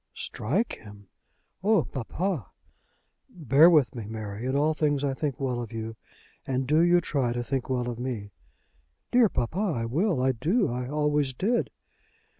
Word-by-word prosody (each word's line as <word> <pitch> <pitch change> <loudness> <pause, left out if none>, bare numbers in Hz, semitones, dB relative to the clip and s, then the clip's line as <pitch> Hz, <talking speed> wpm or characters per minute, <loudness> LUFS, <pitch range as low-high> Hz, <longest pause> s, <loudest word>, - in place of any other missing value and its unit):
"Strike 160 - -2
him! 100 -2 -14 0.5
Oh, 210 -5 +4
papa!" 160 - -3 0.8
"Bear 155 0 +5
with 150 -6 +4
me, 115 -5 -6
Mary. 110 +1 -5
In 130 - 0
all 150 +3 +3
things 145 -2 0
I 140 -1 0
think 140 -1 -3
well 125 -3 -1
of 115 -2 -7
you, 115 0 -5 0.5
and 130 0 0
do 150 +4 +3
you 175 +1 +5
try 135 -7 0
to 120 0 -2
think 130 +2 -3
well 125 -2 0
of 120 -1 -4
me." 115 -5 -4 0.8
"Dear 240 -3 +5
papa! 155 +7 -2
I 160 - 0
will. 160 - +1
I 130 - +4
do. 160 - +1
I 125 0 -4
always 150 -2 0
did." 230 - 0
135 Hz, 165 wpm, -27 LUFS, 120-160 Hz, 0.8 s, Bear